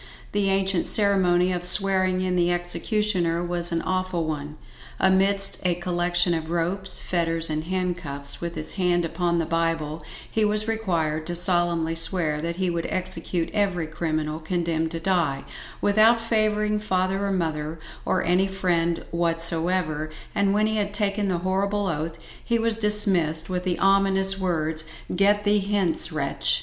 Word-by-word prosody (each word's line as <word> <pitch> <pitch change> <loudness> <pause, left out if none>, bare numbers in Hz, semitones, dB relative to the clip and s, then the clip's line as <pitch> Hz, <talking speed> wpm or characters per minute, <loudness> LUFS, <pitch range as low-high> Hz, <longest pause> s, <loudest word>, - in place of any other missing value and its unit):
The 200 -1 0
ancient 195 -2 0
ceremony 185 -3 +2
of 175 -1 -3
swearing 185 0 +4
in 185 -1 -1
the 175 0 +2
executioner 175 -1 -1
was 175 0 -1
an 165 -1 -1
awful 185 -2 -1
one. 150 -1 -5 0.4
Amidst 195 +1 +3
a 180 -2 +1
collection 175 0 0
of 160 -1 -4
ropes, 175 +3 0
fetters 165 -2 0
and 155 +1 -3
handcuffs, 170 -6 -3
with 170 0 -4
his 155 0 -3
hand 175 -3 +1
upon 170 +1 -1
the 165 - 0
bible, 165 -1 -1 0.3
he 220 - -1
was 210 +1 +3
required 165 -9 -1
to 175 - -2
solemnly 175 -2 +2
swear 165 -2 +1
that 170 +1 -3
he 185 +1 -1
would 170 -1 -2
execute 185 -2 -2
every 195 -5 0
criminal 155 -1 -3
condemned 165 -1 -1
to 165 0 -4
die, 165 -6 0 0.4
without 215 +3 +4
favouring 215 -2 0
father 190 -1 -1
or - - -1
mother, 160 -3 -2 0.3
or - - 0
any 180 +3 +2
friend 175 -3 -1
whatsoever; 165 -1 +1 0.2
and 200 -1 +1
when 210 +1 +2
he 220 0 -1
had 205 -1 -2
taken 205 0 0
the 185 -2 0
horrible 200 +2 0
oath 160 -2 -3 0.3
he 235 - 0
was 225 -1 +2
dismissed 190 -7 +2
with 180 0 -2
the 180 -1 0
ominous 195 0 +3
words 160 -4 -1 0.3
"GET 205 +2 +3
THEE 205 0 +3
HENCE 195 -4 0
WRETCH!" 140 -2 +1
175 Hz, 155 wpm, -24 LUFS, 165-195 Hz, 0.4 s, swearing